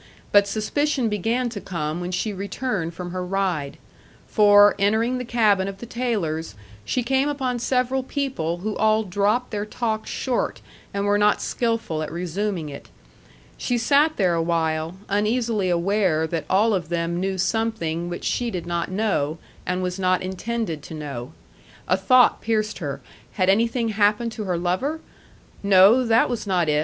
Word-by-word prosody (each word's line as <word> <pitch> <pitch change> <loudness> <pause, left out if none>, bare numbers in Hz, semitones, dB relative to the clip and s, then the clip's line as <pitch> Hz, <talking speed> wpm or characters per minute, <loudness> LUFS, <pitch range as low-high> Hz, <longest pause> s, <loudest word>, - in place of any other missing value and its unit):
But 205 0 +5
suspicion 245 +4 0
began 225 +5 0
to 205 -4 -6
come 160 -1 -3
when 175 - -3
she 210 +3 -1
returned 195 -3 -3
from 175 0 -6
her 185 0 -3
ride. 180 -6 -2 0.5
For, 205 -1 +6
entering 225 +5 +2
the - - -3
cabin 215 -5 +2
of 195 -1 -6
the 235 - -8
Taylors', 195 - -2 0.3
she 250 - -1
came 265 +3 +1
upon 260 -4 -2
several 255 +2 +1
people 255 - -2
who 215 - -1
all 220 0 +3
dropped 205 +5 0
their 205 -1 -2
talk 220 0 -3
short, 255 -2 -2 0.3
and 200 0 -2
were 205 0 +2
not 210 0 +3
skilful 230 -10 -1
at 155 - -4
resuming 180 0 -3
it. 140 -1 -9 0.7
She 245 - 0
sat 285 +6 +3
there 185 -4 +2
awhile, 165 0 0
uneasily 210 -1 0
aware 175 -2 +1
that 160 -2 -3
all 210 +4 +3
of 175 -5 -2
them 170 0 -1
knew 190 +1 -1
something 180 -5 -1
which 175 - -6
she 240 -1 0
did 180 -6 -4
not 170 0 -2
know, 185 -7 0 0.3
and 180 +1 -1
was 180 +1 -3
not 185 0 +1
intended 190 -3 -3
to 160 - -9
know. 140 -4 -6 0.6
A 185 - +3
thought 240 +7 +4
pierced 215 -1 -1
her 140 -5 -4 0.3
had 185 -2 +1
anything 230 +3 +1
happened 210 +2 +2
to 220 -1 -5
her 180 -2 -1
lover? 185 - -1 0.6
No; 200 +5 +6
that 230 -1 +3
was 240 -4 -4
not 180 -4 +1
it. 150 0 +3
200 Hz, 165 wpm, -23 LUFS, 175-230 Hz, 0.7 s, For